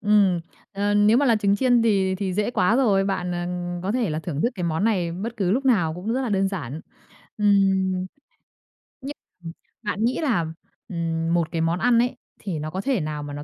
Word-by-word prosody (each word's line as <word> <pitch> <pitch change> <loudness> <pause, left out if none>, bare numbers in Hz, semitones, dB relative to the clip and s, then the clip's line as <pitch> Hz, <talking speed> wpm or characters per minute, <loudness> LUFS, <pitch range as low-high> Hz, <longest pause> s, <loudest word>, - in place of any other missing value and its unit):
Ừm, 205 -4 +3 0.3
ờ, 205 +1 0
nếu 205 +2 +5
mà 280 +2 +3
là 230 -3 +4
trứng 200 -1 +2
chiên 245 0 +3
thì 195 -4 +2
thì 190 -1 -3
dễ 210 +3 0
quá 220 -1 +2
rồi, 205 -7 +3
bạn, 185 -2 -2
ờ, 175 0 -3 0.4
có 195 +3 -1
thể 240 -7 0
là 155 - -2
thưởng 160 -3 -4
thức 240 - +2
cái 180 -3 -4
món 165 +4 0
này 185 -7 +1
bất 220 +7 -5
cứ 190 -5 0
lúc 260 +7 +1
nào 180 -11 +2
cũng 185 +6 -3
rất 260 - 0
là 250 - -2
đơn 195 -1 +1
giản. 155 -6 -5 0.6
Ừm. 195 -2 +3 1.1
Nh 275 +2 -6 0.3
ừm, 165 - -6 0.3
bạn 210 0 -2
nghĩ 245 - 0
là, 225 - +1 0.4
ừm, 165 -2 -2
một 170 -2 0
cái 165 -2 -1
món 165 +2 0
ăn 240 +1 +3
ấy, 245 +1 0 0.2
thì 175 -7 -4
nó 155 - -4
có 185 +4 -4
thể 260 -6 0
nào 150 -1 -4
mà 145 0 -7
nó 145 0 -6
195 Hz, 225 wpm, -23 LUFS, 170-220 Hz, 1.1 s, nếu